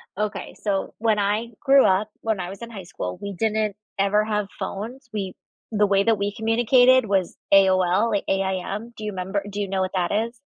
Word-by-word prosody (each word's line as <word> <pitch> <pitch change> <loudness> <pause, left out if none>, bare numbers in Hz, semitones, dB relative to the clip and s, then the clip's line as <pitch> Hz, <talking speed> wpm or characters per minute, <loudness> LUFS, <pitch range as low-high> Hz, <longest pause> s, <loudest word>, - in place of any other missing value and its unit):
Okay, 210 +1 -4
so, 200 -2 -2
when 220 -2 +1
I 210 +3 0
grew 275 -1 +5
up, 195 +3 +2
when 220 -3 -1
I 180 0 -4
was 195 +4 -9
in 235 - -8
high 195 -4 -7
school, 90 - -6
we 200 0 -5
didn't 215 +1 0 0.2
ever 205 +2 +3
have 210 -2 -1
phones. 240 +6 -5
We 195 -3 -3 0.4
the 210 -1 +3
way 195 0 +3
that 225 -1 +3
we 200 0 -2
communicated 240 +3 +4
was 195 -3 0 0.2
AOL 190 +2 +4
like 205 - 0
AIM. 195 +4 -2
Do 215 - -9
you 210 - -2
'member 190 +2 -2
do 205 +1 -5
you 200 - -2
know 190 0 -1
what 185 - -1
that 180 -2 0
is? 225 +3 -1
205 Hz, 205 wpm, -24 LUFS, 195-220 Hz, 0.4 s, grew